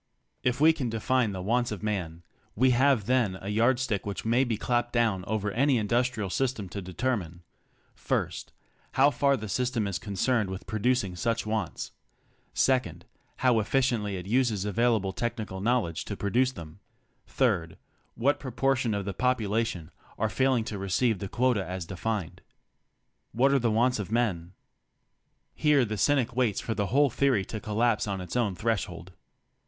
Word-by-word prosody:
If 125 Hz, 0 st, 0 dB
we 160 Hz, +2 st, +6 dB
can 135 Hz, -6 st, -3 dB
define 115 Hz, +1 st, +1 dB
the 95 Hz, -2 st, -5 dB
wants 120 Hz, +4 st, +1 dB
of 105 Hz, -1 st, -5 dB
man, 90 Hz, -6 st, -3 dB, 0.3 s
we 130 Hz, +4 st, +4 dB
have 130 Hz, -3 st, +3 dB
then 120 Hz, -6 st, +1 dB
a 100 Hz, -, -6 dB
yardstick 120 Hz, 0 st, +1 dB
which 100 Hz, +1 st, -5 dB
may 120 Hz, +3 st, +3 dB
be 120 Hz, -4 st, -1 dB
clapped 120 Hz, +1 st, 0 dB
down 110 Hz, -6 st, +1 dB
over 105 Hz, -1 st, -1 dB
any 135 Hz, +4 st, +2 dB
industrial 115 Hz, -2 st, 0 dB
system 125 Hz, -5 st, -1 dB
to 100 Hz, +4 st, -5 dB
determine: 90 Hz, -3 st, -3 dB, 0.6 s
(1) -, -, +1 dB, 0.6 s
How 135 Hz, +2 st, +5 dB
far 140 Hz, -1 st, +2 dB
the 110 Hz, -2 st, -6 dB
system 125 Hz, 0 st, -1 dB
is 100 Hz, -3 st, -2 dB
concerned 110 Hz, +1 st, 0 dB
with 95 Hz, 0 st, -6 dB
producing 110 Hz, -3 st, 0 dB
such 115 Hz, +5 st, -1 dB
wants. 110 Hz, -4 st, -3 dB, 0.6 s
(2) 130 Hz, -1 st, +4 dB, 0.6 s
How 125 Hz, -3 st, +3 dB
efficiently 110 Hz, -3 st, 0 dB
it 90 Hz, -, -7 dB
uses 110 Hz, -2 st, +1 dB
available 105 Hz, -2 st, +1 dB
technical 110 Hz, -5 st, -4 dB
knowledge 110 Hz, -7 st, 0 dB
to 100 Hz, -, -5 dB
produce 125 Hz, +6 st, +1 dB
them. 80 Hz, -8 st, -10 dB, 0.5 s
(3) -, -, 0 dB, 0.4 s
What 140 Hz, +5 st, +1 dB
proportion 130 Hz, -3 st, 0 dB
of 100 Hz, -1 st, -3 dB
the 100 Hz, -, -3 dB
population 115 Hz, -6 st, -1 dB, 0.3 s
are 110 Hz, +1 st, 0 dB
faiHng 130 Hz, +2 st, +1 dB
to 105 Hz, -3 st, -5 dB
receive 100 Hz, +3 st, +1 dB
the 100 Hz, -, -5 dB
quota 120 Hz, -4 st, +1 dB
as 90 Hz, 0 st, -5 dB
defined. 95 Hz, +1 st, -4 dB, 0.9 s
What 135 Hz, +4 st, +3 dB
are 140 Hz, -, +4 dB
the 120 Hz, -2 st, +1 dB
wants 120 Hz, +2 st, +2 dB
of 105 Hz, 0 st, -5 dB
men? 95 Hz, -7 st, -1 dB, 1.0 s
Here 150 Hz, -4 st, +3 dB
the 110 Hz, -1 st, -3 dB
cynic 120 Hz, +2 st, +1 dB
waits 120 Hz, -6 st, +1 dB
for 115 Hz, -, -3 dB
the 100 Hz, -2 st, -1 dB
whole 140 Hz, +5 st, +3 dB
theory 125 Hz, -7 st, +2 dB
to 110 Hz, -, -5 dB
collapse 110 Hz, +1 st, 0 dB
on 100 Hz, -1 st, -2 dB
its 90 Hz, +4 st, -7 dB
own 110 Hz, -6 st, +1 dB
threshold. 95 Hz, -4 st, -2 dB
110 Hz, 160 wpm, -28 LUFS, 100-125 Hz, 1.0 s, we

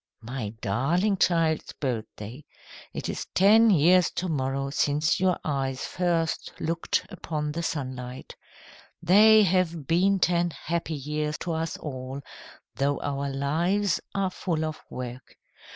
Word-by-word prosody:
"My 120 Hz, -2 st, -4 dB
darling 170 Hz, -, +1 dB
child's 165 Hz, -3 st, +1 dB
birthday. 120 Hz, 0 st, -5 dB, 0.5 s
It -, -, -5 dB
is -, -, -4 dB
ten 220 Hz, +4 st, +6 dB
years 180 Hz, 0 st, +5 dB
to 185 Hz, -, -2 dB
morrow 135 Hz, -3 st, -1 dB
since 150 Hz, +1 st, +1 dB
your 185 Hz, -1 st, +2 dB
eyes 135 Hz, -3 st, -2 dB
first 170 Hz, -3 st, -1 dB
looked 165 Hz, +1 st, -1 dB
upon 150 Hz, -2 st, -3 dB
the 165 Hz, +3 st, -3 dB
sunlight. 130 Hz, -5 st, -5 dB, 0.7 s
They 215 Hz, +5 st, +7 dB
have 175 Hz, -5 st, +1 dB
been 185 Hz, +6 st, +3 dB
ten 175 Hz, -2 st, +1 dB
happy 165 Hz, -1 st, -2 dB
years 150 Hz, +2 st, -3 dB
to 175 Hz, -, -1 dB
us 160 Hz, +1 st, -2 dB
all, 130 Hz, -1 st, -6 dB, 0.5 s
though 140 Hz, +1 st, 0 dB
our 140 Hz, 0 st, -2 dB
lives 170 Hz, +9 st, 0 dB, 0.2 s
are 195 Hz, -2 st, 0 dB
full 165 Hz, -4 st, -2 dB
of 155 Hz, 0 st, -5 dB
work. 125 Hz, -1 st, -8 dB
155 Hz, 130 wpm, -26 LUFS, 135-175 Hz, 0.7 s, They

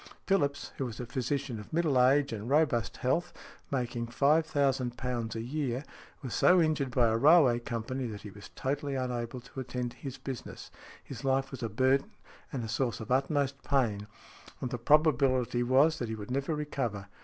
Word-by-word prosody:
Phillips, 145 Hz, -8 st, 0 dB
who 135 Hz, -, -1 dB
was 115 Hz, -1 st, -8 dB
a 125 Hz, -, -4 dB
physician 130 Hz, 0 st, -2 dB
of 105 Hz, -, -11 dB
middle 155 Hz, -6 st, +2 dB
age 140 Hz, 0 st, +3 dB
and 110 Hz, +2 st, -5 dB
robust 140 Hz, -6 st, +2 dB
health, 170 Hz, +8 st, 0 dB, 0.4 s
making 120 Hz, -3 st, -2 dB
£5,000 130 Hz, -4 st, +1 dB
a 115 Hz, -, -3 dB
year, 130 Hz, 0 st, -2 dB, 0.4 s
was 125 Hz, -5 st, -5 dB
so 180 Hz, -, +5 dB
injured 155 Hz, -5 st, +1 dB
by 120 Hz, -1 st, +3 dB
a 110 Hz, -, +2 dB
railway 140 Hz, -2 st, +6 dB
company, 120 Hz, +2 st, -4 dB
that 105 Hz, -3 st, -7 dB
he 105 Hz, -, -8 dB
was 100 Hz, 0 st, -12 dB
totally 140 Hz, +1 st, -2 dB
unable 125 Hz, -1 st, -3 dB
to 125 Hz, +2 st, -10 dB
attend 125 Hz, -1 st, -3 dB
to -, -, -17 dB
his 135 Hz, -2 st, -7 dB
business; 130 Hz, -3 st, -7 dB, 0.3 s
his -, -, -9 dB
life 135 Hz, 0 st, +1 dB
was 135 Hz, -, -7 dB
a 115 Hz, -, -2 dB
burden 130 Hz, +5 st, +2 dB, 0.4 s
and 130 Hz, -4 st, -3 dB
a -, -, -5 dB
source 120 Hz, +1 st, -1 dB
of 110 Hz, +1 st, -7 dB
utmost 135 Hz, +1 st, +1 dB
pain, 110 Hz, -8 st, 0 dB, 0.5 s
and 125 Hz, -, -4 dB
the 125 Hz, -, -3 dB
probability 130 Hz, -3 st, +3 dB
was 135 Hz, +6 st, +4 dB
that 120 Hz, -, -3 dB
he 110 Hz, -, -3 dB
would 105 Hz, +2 st, -8 dB
never 140 Hz, +4 st, -1 dB
recover. 125 Hz, -9 st, -3 dB
130 Hz, 180 wpm, -30 LUFS, 120-140 Hz, 0.5 s, railway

